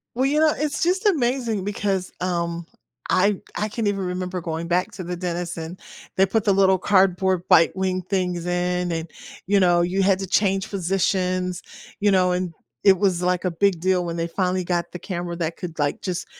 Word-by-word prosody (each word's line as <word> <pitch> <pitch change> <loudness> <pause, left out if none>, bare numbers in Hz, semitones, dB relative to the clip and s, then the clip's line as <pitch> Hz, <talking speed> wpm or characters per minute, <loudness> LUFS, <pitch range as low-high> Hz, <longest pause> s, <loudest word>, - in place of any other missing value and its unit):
Well, 260 +2 +1
you 290 +3 +2
know, 310 -1 +4
it's 300 +1 -1
just 370 +5 +1
amazing 245 - +1
because, 195 -2 -2
um, 170 -2 -2 0.4
I 200 +2 +3 0.2
I 210 - -1
can't 220 0 -2
even 200 -1 0
remember 180 0 -3
going 165 0 -4
back 180 +1 0
to 185 - -6
the 180 +1 -4
dentist 175 -1 -4
and 165 +3 -7 0.4
they 190 - +5
put 210 +2 0
the 210 - +3
little 190 -1 +4
cardboard 185 -1 +2
bite 165 0 +5
wing 185 -1 -1
things 180 -2 -2
in 180 0 -1
and, 165 0 -3 0.4
you 200 +2 +3
know, 175 -1 +4
you 185 +3 +1
had 190 -1 +3
to 195 - -4
change 195 0 +1
positions, 185 -1 0 0.4
you 205 0 +4
know, 185 -1 +3
and 180 -1 -2 0.3
it 195 -2 +6
was, 190 -3 +1
like, 180 0 0
a 180 - +1
big 180 0 +1
deal 185 -1 +1
when 170 -1 -3
they 165 0 -1
finally 185 +1 -1
got 175 -1 -2
the 180 - -6
camera 175 -1 -4
that 165 -1 -3
could, 170 -3 -7
like, 145 -1 0
just 185 -2 -3
185 Hz, 200 wpm, -23 LUFS, 175-195 Hz, 0.4 s, it